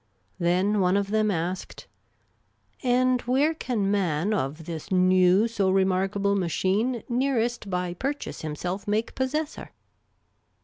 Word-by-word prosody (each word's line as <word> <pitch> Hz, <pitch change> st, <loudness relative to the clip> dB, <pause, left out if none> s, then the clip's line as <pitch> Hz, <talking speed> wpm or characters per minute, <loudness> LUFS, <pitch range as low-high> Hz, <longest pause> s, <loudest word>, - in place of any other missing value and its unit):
Then 185 Hz, +4 st, +2 dB
one 185 Hz, +1 st, +3 dB
of 200 Hz, 0 st, -2 dB
them 215 Hz, 0 st, +2 dB
asked, 180 Hz, 0 st, -3 dB, 0.5 s
" -, -, -44 dB, 0.2 s
And 255 Hz, 0 st, +2 dB
where 275 Hz, +6 st, +2 dB
can 225 Hz, -10 st, -1 dB
man 190 Hz, -1 st, 0 dB
of 155 Hz, -3 st, -3 dB
this 165 Hz, +2 st, -7 dB
new 185 Hz, +2 st, +4 dB
so 205 Hz, -4 st, 0 dB
remarkable 195 Hz, +1 st, +1 dB
machine 200 Hz, +6 st, 0 dB
nearest 240 Hz, -3 st, 0 dB
by 180 Hz, -1 st, -2 dB
pur 270 Hz, +11 st, -1 dB
chase 290 Hz, -, -8 dB
himself 175 Hz, +6 st, -4 dB
make 215 Hz, +3 st, -1 dB
possessor 300 Hz, +4 st, -3 dB
200 Hz, 130 wpm, -26 LUFS, 180-240 Hz, 0.5 s, new